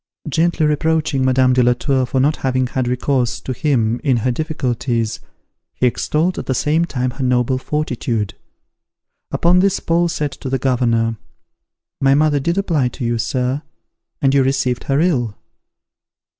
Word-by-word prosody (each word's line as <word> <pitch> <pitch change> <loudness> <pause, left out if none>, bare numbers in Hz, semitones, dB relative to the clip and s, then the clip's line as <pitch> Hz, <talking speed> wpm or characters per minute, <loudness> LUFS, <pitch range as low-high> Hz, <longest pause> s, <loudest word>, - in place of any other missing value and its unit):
Gently 160 +1 +1
reproaching 150 -2 +1
Madame 130 0 +3
de 125 - +3
la 125 0 +4
Tour 130 0 0
for 130 - 0
not 145 +4 +2
having 130 -1 0
had 125 0 -2
recourse 125 0 0
to 130 - -5
him 120 -4 0
in 135 -5 +2
her 125 +3 0
difficulties, 120 -6 -2 0.6
he - - 0
extolled 160 +8 0
at - - -7
the 130 - 0
same 155 +6 +1
time 130 -5 -2
her 135 +2 -5
noble 125 0 +1
fortitude. 120 -8 -2 1.0
Upon 175 +2 +3
this 195 +1 +2
Paul 170 +1 +1
said 150 -3 -2
to 135 - -7
the 135 - 0
governor, 115 -4 +1 0.8
"My 135 0 +4
mother 150 0 +3
did 170 +6 -1
apply 165 -9 +1
to 125 0 -5
you, 115 0 0
sir, 130 +4 -1 0.6
and 135 -1 +4
you 140 - +4
received 130 -2 0
her 135 +1 +1
ill." 125 - 0
130 Hz, 160 wpm, -18 LUFS, 125-150 Hz, 1.0 s, la